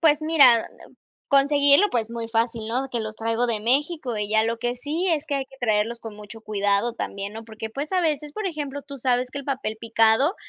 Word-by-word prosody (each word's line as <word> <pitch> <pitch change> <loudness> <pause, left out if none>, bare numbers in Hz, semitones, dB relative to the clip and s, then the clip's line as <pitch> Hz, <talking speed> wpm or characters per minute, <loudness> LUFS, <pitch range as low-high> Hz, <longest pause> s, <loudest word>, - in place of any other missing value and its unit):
Pues 310 -2 +4
mira, 275 -8 +6 0.2
em, - - -21 0.3
conseguirlo. 285 +5 +5
Pues 230 -2 -1
muy 230 -1 -5
fácil, 225 -1 -1
¿no? 255 +4 -1
Que 240 - -2
los 215 0 -6
traigo 230 +2 0
de 220 -3 -1
México 270 +1 0
y 210 -1 -2
ya 220 0 +4
lo 230 0 -2
que 240 +1 -2
sí 300 +8 -2
es 315 -4 +1
que 285 - -2
hay 270 - -2
que 270 - -18
traerlos 220 0 0
con 225 -2 -8
mucho 210 +2 -11
cuidado 205 +1 0
también, 200 -3 -5
¿no?, 225 +1 -8
porque 220 0 -7
pues, 280 +8 -5
a 370 - +3
veces, 300 -3 -1
por 425 +4 -4
ejemplo, 285 -4 -4
tú 280 -1 -10
sabes 250 0 0
que 280 - -6
el 280 - -7
papel 260 -6 -3
picado 225 - +3
245 Hz, 230 wpm, -24 LUFS, 225-285 Hz, 0.3 s, mira